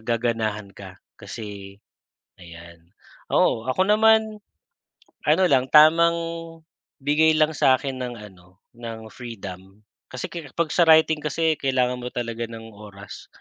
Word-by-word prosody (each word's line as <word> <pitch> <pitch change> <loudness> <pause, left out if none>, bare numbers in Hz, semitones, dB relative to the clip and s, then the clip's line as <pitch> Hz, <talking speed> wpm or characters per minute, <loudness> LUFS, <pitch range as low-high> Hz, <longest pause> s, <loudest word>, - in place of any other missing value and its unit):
gaganahan 110 -3 -2
ka. 95 -2 -12 0.2
Kasi 100 -3 -9 0.7
ayan. 85 0 -14 0.4
Oo, 110 - +2
ako 185 +8 +1
naman, 220 0 +3 0.9
ano 160 +5 +3
lang 130 -2 +3
tamang 165 +2 +6 0.9
bigay 155 +3 +3
lang 155 0 +1
sa'kin 130 0 +2
ng 125 -1 -5
ano 90 -2 -16 0.2
ng 115 -2 -8
freedom. 100 -5 -10 0.3
Kasi 130 - -6
ker 155 -7 -9
'pag 170 -2 -1
sa 170 +2 +3
writing 160 -1 +5
kasi 160 +1 0
kailangan 125 -2 0
mo 125 0 -7
talaga 115 -1 -4
ng 115 -1 -10
oras. 100 -2 -12
120 Hz, 125 wpm, -23 LUFS, 105-155 Hz, 0.9 s, tamang